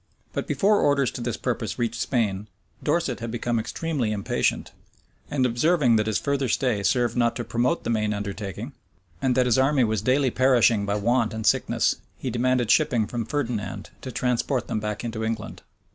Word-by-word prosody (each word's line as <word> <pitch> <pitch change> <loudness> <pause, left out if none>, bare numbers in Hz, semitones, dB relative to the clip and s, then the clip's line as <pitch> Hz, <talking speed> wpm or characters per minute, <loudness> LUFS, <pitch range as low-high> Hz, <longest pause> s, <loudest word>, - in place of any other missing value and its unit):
But - - -3
before 205 0 +3
orders 140 -3 +2
to - - -7
this 120 0 -2
purpose 115 -4 -3
reached 120 -2 -2
Spain, 105 -5 -1 0.3
Dorset 150 -4 0
had 115 0 -5
become 120 0 -1
extremely 130 0 -2
impatient; 100 -2 -1 0.6
and 130 -3 +1
observing 125 +1 +3
that 105 0 0
his 110 -1 +1
further 140 -2 -1
stay 125 -4 +1
served 120 +2 +1
not 120 -1 +2
to 120 - -3
promote 120 +9 0
the - - -1
main 105 -2 0
undertaking, 100 -2 -5 0.5
and 130 -2 +2
that 125 0 +3
his 125 0 +3
army 135 0 +3
was 110 -1 0
daily 130 0 +2
perishing 120 -5 +3
by 100 - 0
want 115 +1 +1
and 110 -1 -4
sickness, - - +2 0.2
he 130 - -4
demanded 120 0 +1
shipping 125 -7 +3
from 115 +1 -4
Ferdinand 110 -8 -3
to 130 - -6
transport 125 0 0
them - - -1
back 105 0 -4
into 115 -2 -4
England. 110 0 -4
120 Hz, 180 wpm, -25 LUFS, 110-130 Hz, 0.6 s, before